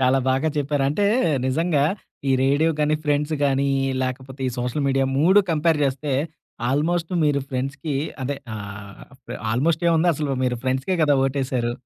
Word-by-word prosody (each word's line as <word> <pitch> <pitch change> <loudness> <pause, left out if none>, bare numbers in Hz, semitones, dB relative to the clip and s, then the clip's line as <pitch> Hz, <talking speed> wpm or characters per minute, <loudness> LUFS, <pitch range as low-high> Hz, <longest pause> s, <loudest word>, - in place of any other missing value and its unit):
చాలా 130 +1 +3
బాగా 135 +4 +2
చెప్పారు. 145 -1 0
అంటే 200 +9 0 0.4
నిజంగా 150 +1 +1 0.5
ఈ - - +4
రేడియో 145 +4 +3
గానీ, 150 +1 +2
ఫ్రెండ్స్ 150 +1 0
గానీ 140 0 +2 0.2
ఈ 135 - -1
లేకపోతే 130 +1 -5
ఈ - - -2
సోషల్ 125 +4 -1
మీడియా 135 0 +2
3 190 +7 +6
కంపేర్ 160 0 +2
జేస్తే 140 +1 -1 0.6
ఆల్‍మోస్ట్ 165 +5 0
మీరు 145 -1 +2
ఫ్రెండ్స్‌కి 140 +3 -3 0.3
అదే 140 +2 -2 0.2
ఆహ్, 100 -1 -9 0.2
ఫ్ - - -8 0.2
ఆల్‍మోస్ట్ 155 +8 +1
ఏముంది 170 +1 +3
అసలు 145 -1 -2
మీరు 125 -1 0
ఫ్రెండ్స్‌కే 130 +8 0
గదా! 145 -2 +4
ఓటేశారు. 130 -3 -1
140 Hz, 155 wpm, -23 LUFS, 130-155 Hz, 0.6 s, 3